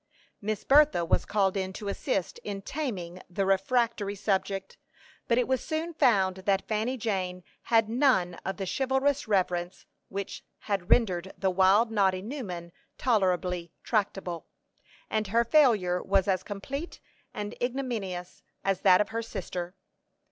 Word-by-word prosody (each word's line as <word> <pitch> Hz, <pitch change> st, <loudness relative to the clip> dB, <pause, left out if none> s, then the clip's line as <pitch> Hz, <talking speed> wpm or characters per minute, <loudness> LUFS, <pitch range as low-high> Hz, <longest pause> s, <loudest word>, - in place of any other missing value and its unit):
Miss 215 Hz, 0 st, -2 dB
Bertha 285 Hz, -, +5 dB
was -, -, +1 dB
called 200 Hz, -2 st, +1 dB
in 190 Hz, -1 st, -2 dB
to 205 Hz, -, -7 dB
assist 195 Hz, -2 st, -2 dB
in 200 Hz, -1 st, -6 dB
taming 185 Hz, -, -4 dB
the 195 Hz, +2 st, -1 dB
refractory 205 Hz, +1 st, +1 dB
subject; 195 Hz, -1 st, -1 dB, 0.5 s
but 235 Hz, -, +3 dB
it 250 Hz, -, +2 dB
was 260 Hz, -1 st, 0 dB
soon 320 Hz, +2 st, -3 dB
found 195 Hz, -, +3 dB
that 195 Hz, 0 st, 0 dB
Fanny 220 Hz, +4 st, -1 dB
Jane 185 Hz, -5 st, -2 dB, 0.2 s
had 225 Hz, -2 st, +4 dB
none 230 Hz, -7 st, +3 dB
of 190 Hz, -1 st, -3 dB
the 195 Hz, -, -3 dB
chivalrous 265 Hz, +5 st, +1 dB
reverence 180 Hz, -3 st, 0 dB, 0.2 s
which 200 Hz, 0 st, -5 dB, 0.2 s
had 195 Hz, -4 st, -2 dB
rendered 190 Hz, -5 st, +2 dB
the 190 Hz, -1 st, +1 dB
wild 195 Hz, +5 st, +4 dB
Noddy 190 Hz, -3 st, +2 dB
Newman 195 Hz, -9 st, -6 dB, 0.3 s
tolerably 180 Hz, -6 st, +1 dB
tractable, 195 Hz, -5 st, -1 dB, 0.6 s
and 215 Hz, -1 st, -1 dB
her 230 Hz, +4 st, +3 dB
failure 220 Hz, -10 st, +4 dB
was 195 Hz, 0 st, +2 dB
as 185 Hz, -2 st, +2 dB
complete 265 Hz, -, -6 dB, 0.3 s
and 210 Hz, +1 st, -5 dB
ignominious 235 Hz, -9 st, -3 dB, 0.2 s
as 195 Hz, -2 st, 0 dB
that 185 Hz, -1 st, +6 dB
of 210 Hz, -, -1 dB
her 225 Hz, +1 st, -2 dB
sister. 185 Hz, -5 st, -5 dB
200 Hz, 140 wpm, -28 LUFS, 185-235 Hz, 0.6 s, that